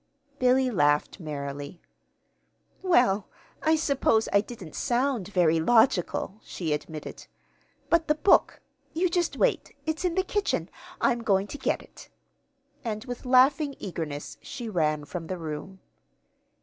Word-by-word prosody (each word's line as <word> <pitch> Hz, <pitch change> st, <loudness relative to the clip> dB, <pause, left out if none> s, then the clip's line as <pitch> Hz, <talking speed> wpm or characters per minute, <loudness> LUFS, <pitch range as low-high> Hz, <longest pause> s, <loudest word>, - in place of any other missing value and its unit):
Billy 255 Hz, 0 st, +3 dB
laughed 145 Hz, -2 st, +2 dB
merrily. 145 Hz, 0 st, -6 dB, 1.0 s
"Well, 245 Hz, -, +3 dB, 0.3 s
I 315 Hz, +1 st, +3 dB
suppose 275 Hz, -7 st, +2 dB
I 200 Hz, -, +6 dB
didn't 205 Hz, -7 st, -10 dB
sound 245 Hz, -5 st, 0 dB
very 175 Hz, -5 st, +3 dB
logical," 215 Hz, 0 st, +2 dB
she 160 Hz, -4 st, -3 dB
admitted. 150 Hz, +1 st, -6 dB, 0.6 s
"But 335 Hz, -1 st, +2 dB
the 300 Hz, -, +3 dB
book 380 Hz, -, +3 dB, 0.3 s
you 355 Hz, +3 st, +1 dB
just 345 Hz, -1 st, 0 dB
wait. -, -, 0 dB
It's 315 Hz, +2 st, -2 dB
in 355 Hz, -2 st, 0 dB
the 375 Hz, -, +2 dB
kitchen. 410 Hz, +2 st, -1 dB, 0.3 s
I'm 240 Hz, 0 st, +2 dB
going 195 Hz, -3 st, +2 dB
to 250 Hz, -, -8 dB
get -, -, -1 dB
it." -, -, -15 dB, 0.7 s
And 215 Hz, -2 st, -4 dB
with 245 Hz, 0 st, -7 dB
laughing 275 Hz, +3 st, +4 dB
eagerness 155 Hz, -6 st, -5 dB
she 245 Hz, -5 st, -7 dB
ran 155 Hz, -6 st, 0 dB
from 165 Hz, +2 st, -6 dB
the 185 Hz, -, -3 dB
room. 165 Hz, +4 st, -6 dB
215 Hz, 135 wpm, -27 LUFS, 165-275 Hz, 1.0 s, I